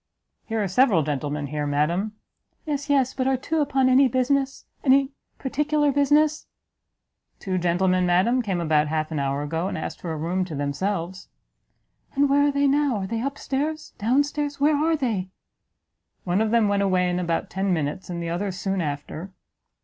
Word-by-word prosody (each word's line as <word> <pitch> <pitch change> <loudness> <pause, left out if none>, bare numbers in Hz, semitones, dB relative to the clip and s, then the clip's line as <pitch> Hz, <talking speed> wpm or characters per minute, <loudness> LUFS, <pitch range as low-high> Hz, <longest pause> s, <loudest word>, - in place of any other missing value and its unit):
"Here 225 -2 -1
are - - 0
several 190 - +3
gentlemen 145 0 -2
here, 150 +1 -3
madam." 170 +9 0 0.5
"Yes, 290 -1 -3
yes, 270 -3 +2
but 260 -1 -1
are 265 -1 +2
two 320 +5 -2
upon 270 -2 +2
any 260 +1 +5
business 265 +2 0 0.2
any 275 0 +4 0.3
particular 295 +2 +1
business 295 +2 +2 0.4
" - - -52
"Two 185 -1 -2
gentlemen, 180 +1 +2
madam, 190 +9 +3
came 195 -6 -2
about 155 -2 +2
half 155 +1 -2
an 155 - -2
hour 140 +1 -1
ago, 160 +4 -2
and - - -3
asked 155 - -6
for 170 - -4
a 160 - -3
room 175 +4 -1
to 165 -4 -6
themselves." 170 +6 -3 0.9
"And 280 0 +3
where 285 +1 +4
are - - +2
they 280 0 +1
now? 280 -2 +2
are 195 - -3
they 225 +3 -3
up 275 +2 -3
stairs? 305 +3 -3
down 250 +7 +3
stairs? 290 0 -4
where 295 +2 +4
are 320 +3 +2
they?" 220 -10 -2 0.9
"One 180 +3 +1
of 220 - +1
them 230 -1 +3
went 200 0 +1
away 185 -2 +2
in 180 0 0
about 170 -2 -2
ten 190 +1 -1
minutes, 160 +2 -2
and 170 -1 -4
the 170 - -3
other 190 +4 -2
soon 190 +1 -2
after." 150 +4 -5
200 Hz, 190 wpm, -24 LUFS, 170-275 Hz, 0.9 s, any